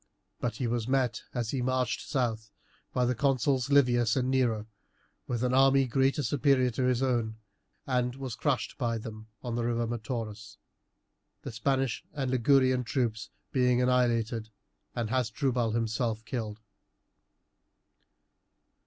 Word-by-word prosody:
But 115 Hz, -2 st, -2 dB
he 125 Hz, -, -2 dB
was 120 Hz, -1 st, -1 dB
met, 130 Hz, -3 st, +1 dB
as 120 Hz, -3 st, -2 dB
he 135 Hz, -, -1 dB
marched 130 Hz, +3 st, -1 dB
south, 115 Hz, -6 st, -1 dB, 0.4 s
by 125 Hz, -, +1 dB
the 125 Hz, -, +2 dB
consuls 135 Hz, 0 st, +1 dB
Livius 120 Hz, -5 st, +4 dB
and 130 Hz, -1 st, +1 dB
Nero 120 Hz, -5 st, +1 dB, 0.6 s
with 120 Hz, -1 st, -2 dB
an 125 Hz, 0 st, +1 dB
army 135 Hz, +1 st, +5 dB
greatly 135 Hz, +3 st, +1 dB
superior 130 Hz, 0 st, +2 dB
to 125 Hz, +3 st, -1 dB
his 125 Hz, 0 st, +2 dB
own; 115 Hz, -4 st, 0 dB, 0.5 s
and 125 Hz, -1 st, 0 dB
was 135 Hz, -3 st, -5 dB
crushed 125 Hz, 0 st, -1 dB
by 115 Hz, -3 st, 0 dB
them 110 Hz, 0 st, -8 dB, 0.2 s
on 120 Hz, -2 st, -3 dB
the 120 Hz, 0 st, -1 dB
river 120 Hz, 0 st, 0 dB
Metaurus, 110 Hz, -2 st, -5 dB, 0.9 s
the -, -, -5 dB
Spanish 135 Hz, +1 st, 0 dB
and 135 Hz, -4 st, -2 dB
Ligurian 130 Hz, 0 st, +3 dB
troops 115 Hz, -2 st, -1 dB, 0.2 s
being 125 Hz, -2 st, +3 dB
annihilated 120 Hz, -3 st, +1 dB, 0.5 s
and 115 Hz, -2 st, -2 dB
Hasdrubal 125 Hz, -1 st, 0 dB
himself 115 Hz, 0 st, -1 dB
killed. 110 Hz, -3 st, -4 dB
125 Hz, 135 wpm, -29 LUFS, 115-130 Hz, 0.9 s, army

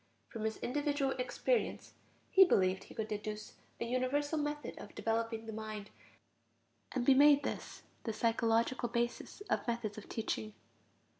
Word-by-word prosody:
From 220 Hz, -2 st, -4 dB
his 220 Hz, -, -1 dB
individual 285 Hz, +1 st, 0 dB
experience 470 Hz, -, 0 dB, 0.4 s
he 380 Hz, -, +9 dB
believed 190 Hz, -, +2 dB
he -, -, -13 dB
could 220 Hz, -, -2 dB
deduce 210 Hz, 0 st, -5 dB, 0.3 s
a -, -, -1 dB
universal 275 Hz, +5 st, 0 dB
method 295 Hz, -3 st, -3 dB
of -, -, -10 dB
developing 225 Hz, 0 st, -1 dB
the 220 Hz, -, -6 dB
mind, 215 Hz, -1 st, -6 dB, 1.0 s
and 255 Hz, -2 st, -1 dB
be 270 Hz, -, +7 dB
made 285 Hz, +1 st, +7 dB
this -, -, -5 dB, 0.2 s
the 225 Hz, -, -1 dB
psychological 230 Hz, +2 st, +1 dB
basis 240 Hz, -, -2 dB
of 410 Hz, -, -1 dB
methods 230 Hz, -3 st, -2 dB
of -, -, -13 dB
teaching. 215 Hz, -1 st, -3 dB
235 Hz, 145 wpm, -34 LUFS, 220-280 Hz, 1.0 s, he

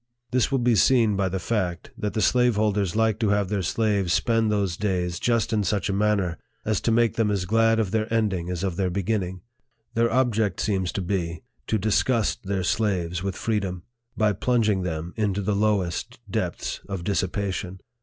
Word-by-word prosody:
This 125 Hz, +1 st, +2 dB
will 135 Hz, -, +2 dB
be 120 Hz, -1 st, +3 dB
seen 115 Hz, -1 st, +4 dB
by 95 Hz, -1 st, +1 dB
the 95 Hz, -, -2 dB
fact, 90 Hz, -3 st, -2 dB
that 105 Hz, -, -3 dB
the 110 Hz, -, +1 dB
slaveholders 105 Hz, -6 st, +2 dB
like 110 Hz, -1 st, +2 dB
to 110 Hz, -3 st, +1 dB
have 100 Hz, -2 st, +1 dB
their 100 Hz, -1 st, 0 dB
slaves 100 Hz, -1 st, 0 dB
spend 115 Hz, +2 st, +2 dB
those 100 Hz, -4 st, 0 dB
days 90 Hz, -3 st, -1 dB
just 115 Hz, -1 st, +1 dB
in 105 Hz, -1 st, +2 dB
such 100 Hz, 0 st, 0 dB
a -, -, 0 dB
man 105 Hz, +1 st, +2 dB
ner 90 Hz, -4 st, -2 dB, 0.3 s
as 110 Hz, -2 st, 0 dB
to 115 Hz, -, +1 dB
make 115 Hz, -1 st, +2 dB
them 110 Hz, -2 st, +2 dB
as 100 Hz, -3 st, 0 dB
glad 115 Hz, +2 st, +3 dB
of 105 Hz, -4 st, 0 dB
their 110 Hz, 0 st, -1 dB
ending 100 Hz, -6 st, 0 dB
as 90 Hz, 0 st, -3 dB
of 95 Hz, -3 st, -2 dB
their 95 Hz, -2 st, +1 dB
beginning. 95 Hz, -1 st, -2 dB, 0.5 s
Their 115 Hz, +1 st, +2 dB
object 115 Hz, -6 st, +1 dB
seems 95 Hz, -4 st, 0 dB
to 95 Hz, -, -2 dB
be, 85 Hz, -3 st, -2 dB, 0.2 s
to 110 Hz, -, +1 dB
disgust 110 Hz, +2 st, +1 dB
their 95 Hz, -1 st, -1 dB
slaves 90 Hz, -4 st, 0 dB
with 95 Hz, -1 st, -3 dB
freedom, 95 Hz, -6 st, -2 dB, 0.3 s
by 105 Hz, -1 st, +3 dB
plunging 110 Hz, -2 st, +1 dB
them 85 Hz, -1 st, -4 dB
into 100 Hz, -2 st, 0 dB
the 105 Hz, -, 0 dB
lowest 100 Hz, -4 st, 0 dB
depths -, -, -3 dB
of 95 Hz, -3 st, -4 dB
dissipation. 95 Hz, -1 st, -2 dB
100 Hz, 190 wpm, -25 LUFS, 95-110 Hz, 0.5 s, seen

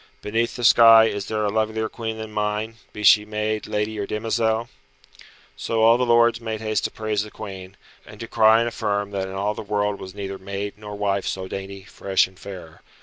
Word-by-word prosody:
Beneath 115 Hz, +3 st, -1 dB
the 120 Hz, -, -6 dB
sky 115 Hz, -1 st, +8 dB
is 100 Hz, -2 st, -3 dB
there 110 Hz, -1 st, -1 dB
a 100 Hz, -, 0 dB
lovelier 110 Hz, +1 st, -1 dB
Queen 110 Hz, -1 st, -5 dB
than 110 Hz, -1 st, -7 dB
mine, 105 Hz, +1 st, -2 dB
be 105 Hz, -, -8 dB
she 105 Hz, 0 st, +7 dB
maid, 105 Hz, 0 st, -3 dB
lady 105 Hz, +1 st, -2 dB
or 100 Hz, -, -3 dB
demoiselle?" 110 Hz, +1 st, -1 dB, 0.9 s
So 115 Hz, -1 st, -1 dB
all 115 Hz, +2 st, +6 dB
the 125 Hz, -, +1 dB
lords 120 Hz, 0 st, +4 dB
made 110 Hz, -1 st, -4 dB
haste 110 Hz, 0 st, -1 dB
to -, -, -2 dB
praise 110 Hz, -2 st, -2 dB
the 105 Hz, -, -7 dB
Queen, 95 Hz, -3 st, -9 dB, 0.3 s
and -, -, -14 dB
to 115 Hz, -, -6 dB
cry 110 Hz, -1 st, +5 dB
and 120 Hz, -, 0 dB
affirm 105 Hz, -3 st, -2 dB
that 95 Hz, -1 st, -3 dB
in 95 Hz, -, -7 dB
all 100 Hz, +2 st, -1 dB
the -, -, -7 dB
world 105 Hz, -1 st, -1 dB
was 95 Hz, 0 st, -9 dB
neither 100 Hz, -1 st, -6 dB
maid 100 Hz, +1 st, -5 dB
nor 105 Hz, -1 st, -9 dB
wife 100 Hz, -1 st, -1 dB
so 95 Hz, 0 st, -3 dB
dainty, 95 Hz, 0 st, -7 dB
fresh 95 Hz, 0 st, +1 dB
and 95 Hz, 0 st, -16 dB
fair. 90 Hz, -5 st, -10 dB
105 Hz, 210 wpm, -23 LUFS, 100-110 Hz, 0.9 s, sky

